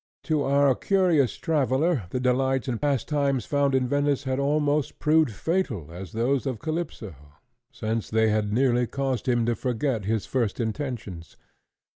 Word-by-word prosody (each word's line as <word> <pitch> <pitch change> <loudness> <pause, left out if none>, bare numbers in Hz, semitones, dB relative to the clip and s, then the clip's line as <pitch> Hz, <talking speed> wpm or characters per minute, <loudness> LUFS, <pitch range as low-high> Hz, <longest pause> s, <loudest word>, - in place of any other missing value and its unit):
To 155 -2 0
our 140 0 +3
curious 175 - +2
traveller 150 - +1
the 125 - -2
delights 130 +1 +1
and 120 -3 -2
pastimes 140 -1 0
found 140 -1 +1
in 130 -1 +1
Venice 145 +1 +1
had 130 0 -1
almost 145 0 0
proved 155 -1 +3
fatal 110 - -2
as 90 0 -9
those 130 +5 0
of 130 -4 -2
Calypso, 155 - -4 0.6
since 110 0 -3
they 110 0 +2
had 105 -1 0
nearly 125 +1 +2
caused 135 -2 -2
him 120 -2 +2
to 120 - +1
forget 125 -2 -2
his 110 0 -1
first 120 -5 -1
intentions. 110 - -5
130 Hz, 150 wpm, -25 LUFS, 115-145 Hz, 0.6 s, our